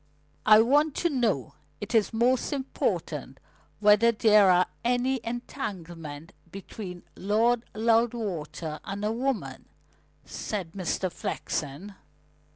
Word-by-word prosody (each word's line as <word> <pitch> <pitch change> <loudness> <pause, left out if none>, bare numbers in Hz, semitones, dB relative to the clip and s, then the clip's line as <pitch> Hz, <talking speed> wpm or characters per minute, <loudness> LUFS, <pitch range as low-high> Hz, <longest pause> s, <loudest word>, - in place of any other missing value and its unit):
"I 215 0 +9
want 290 +5 +3
to 345 - 0
know 225 - 0 0.3
it 205 - -6
is 220 -3 +3
most 240 +2 +1
important 270 -1 -3 0.4
whether 210 +2 +5
there 215 -2 +5
was 180 0 +5 0.2
any 250 +2 +1
entanglement 175 - -6 0.2
between 190 -1 -8
Lord 225 +4 +2
Loudwater 215 -9 0
and 200 +1 -4
a 215 - +1
woman," 255 +1 -3 0.6
said 190 -6 -5
Mr. 185 0 -2
Flexen. 160 +6 -4
215 Hz, 105 wpm, -27 LUFS, 185-240 Hz, 0.6 s, I